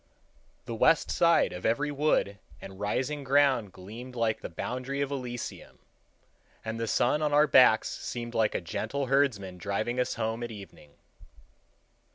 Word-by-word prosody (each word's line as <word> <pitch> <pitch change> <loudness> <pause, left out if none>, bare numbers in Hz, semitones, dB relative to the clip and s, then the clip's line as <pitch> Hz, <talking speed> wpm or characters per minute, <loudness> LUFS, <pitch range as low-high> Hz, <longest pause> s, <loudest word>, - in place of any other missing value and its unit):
The 115 - -5
west 145 +7 +3
side 170 -1 +3
of 90 - -7
every 145 +6 +1
wood 140 -9 0 0.2
and 95 0 -11
rising 130 +8 -2
ground 135 -6 +3
gleamed 115 +8 -10
like 110 -2 0
the - - -6
boundary 130 +10 -4
of 140 0 -2
Elysium, 125 -3 -6 0.9
and 110 0 -4
the 115 - -2
sun 135 +7 +2
on 150 -1 0
our 150 +1 +6
backs 125 -6 +5
seemed 120 -1 -6
like 110 -2 +1
a - - -1
gentle 110 +10 -3
herdsman 120 -9 0
driving 110 +6 -2
us 125 - 0
home 115 +1 -2
at 120 - -4
evening. 100 -9 -12
120 Hz, 155 wpm, -28 LUFS, 110-140 Hz, 0.9 s, our